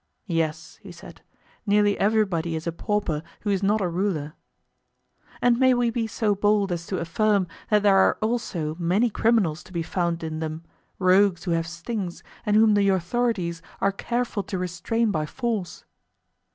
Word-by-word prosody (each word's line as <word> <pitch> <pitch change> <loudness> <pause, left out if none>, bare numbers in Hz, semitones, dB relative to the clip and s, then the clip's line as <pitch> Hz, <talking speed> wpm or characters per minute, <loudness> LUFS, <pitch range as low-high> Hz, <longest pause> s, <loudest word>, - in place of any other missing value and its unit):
Yes, 160 -3 -2
he - - -11
said; - - -13 0.4
nearly 205 -1 +3
everybody 195 -6 +1
is 160 - -5
a 170 - -1
pauper 170 -3 -1 0.2
who 205 - -1
is 195 -1 0
not 205 +2 +2
a 185 - +1
ruler. 170 -4 -2 1.1
And 240 -1 +4
may 260 -1 +5
we 240 -1 +1
be 230 -1 -1
so 220 -1 0
bold 205 -1 +2
as 170 -1 -3
to 190 - -2
affirm 195 +4 +1 0.2
that 210 -1 +3
there 200 -2 +5
are 190 - +4
also 215 -9 -2
many 195 +8 +2
criminals 200 -9 +2
to - - -15
be 170 -2 -2
found 170 -1 -2
in 155 -1 -4
them, 160 +1 -4 0.3
rogues 185 0 +3
who 180 - -2
have 165 0 0
stings, 175 +2 -5 0.2
and 210 - +3
whom 215 0 +6
the 200 -1 +3
authorities 185 -2 0 0.2
are 195 - +2
careful 235 +2 -2
to 195 - -5
restrain 185 +6 -1
by 155 -4 -1
force? 225 - -3
195 Hz, 170 wpm, -25 LUFS, 170-215 Hz, 1.1 s, whom